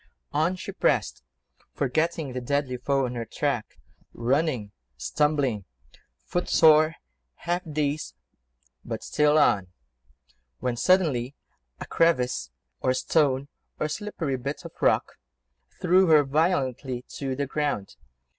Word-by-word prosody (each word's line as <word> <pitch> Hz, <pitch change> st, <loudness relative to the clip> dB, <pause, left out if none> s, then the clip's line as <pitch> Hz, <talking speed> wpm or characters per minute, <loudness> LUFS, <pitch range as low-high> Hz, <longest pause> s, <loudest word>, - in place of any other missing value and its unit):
On 160 Hz, +5 st, +1 dB
she 185 Hz, -, -7 dB
pressed, -, -, 0 dB, 0.5 s
forgetting 155 Hz, +1 st, -1 dB
the 125 Hz, -, -3 dB
deadly 135 Hz, 0 st, -1 dB
foe 135 Hz, +2 st, +1 dB
on 125 Hz, -, -4 dB
her 120 Hz, -1 st, -3 dB
track, 120 Hz, -, -3 dB, 0.4 s
running, 125 Hz, -3 st, 0 dB, 0.3 s
stumbling, 140 Hz, -, 0 dB, 0.6 s
foot 175 Hz, -, -2 dB
sore, 155 Hz, 0 st, +6 dB, 0.4 s
half 175 Hz, +1 st, -2 dB
dazed, 150 Hz, 0 st, -2 dB, 0.7 s
but -, -, -5 dB
still 150 Hz, 0 st, +3 dB
on... 100 Hz, -11 st, +3 dB, 0.9 s
When, 120 Hz, -, -2 dB
suddenly, 140 Hz, -4 st, +2 dB, 0.4 s
a -, -, -6 dB
crevice, 125 Hz, -, +1 dB, 0.3 s
or 130 Hz, 0 st, +1 dB
stone, 135 Hz, 0 st, +1 dB, 0.3 s
or 155 Hz, -, 0 dB
slippery 160 Hz, -6 st, -3 dB
bit 140 Hz, +4 st, -5 dB
of -, -, -7 dB
rock, -, -, +1 dB, 0.6 s
threw 185 Hz, +1 st, +4 dB
her 155 Hz, -2 st, +6 dB
violently 135 Hz, -4 st, 0 dB
to 135 Hz, -2 st, -2 dB
the 140 Hz, +1 st, -1 dB
ground. 140 Hz, -8 st, -2 dB
140 Hz, 120 wpm, -26 LUFS, 125-155 Hz, 0.9 s, sore